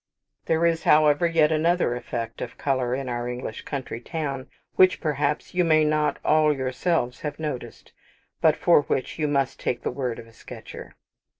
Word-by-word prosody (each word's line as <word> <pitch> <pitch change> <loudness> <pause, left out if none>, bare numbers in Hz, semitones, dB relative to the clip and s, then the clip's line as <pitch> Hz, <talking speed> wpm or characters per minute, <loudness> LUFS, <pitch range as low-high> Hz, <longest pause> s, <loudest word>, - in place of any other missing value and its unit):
There 165 +1 +2
is, 165 -1 +2
however, 150 +2 +4
yet 160 -2 +3
another 160 -4 +2
effect 115 -2 -5
of 120 - -6
colour 130 -3 0
in 135 0 -4
our 120 0 -3
English 125 -2 -6
country 130 -4 -5
towns 140 -2 -4 0.3
which, 185 0 +5
perhaps, 150 0 -1
you 180 0 +2
may 155 -2 +4
not 150 0 +1
all 155 0 +4
yourselves 130 0 -1
have 145 -1 -4
noticed, 150 -5 -6 0.5
but 155 -2 +5
for 170 -4 +5
which 135 +1 -3
you 155 - +1
must 140 -2 0
take 120 - -2
the - - -1
word 125 -2 -3
of - - -9
a 115 - -19
sketcher. - - -11
145 Hz, 175 wpm, -25 LUFS, 125-155 Hz, 0.5 s, which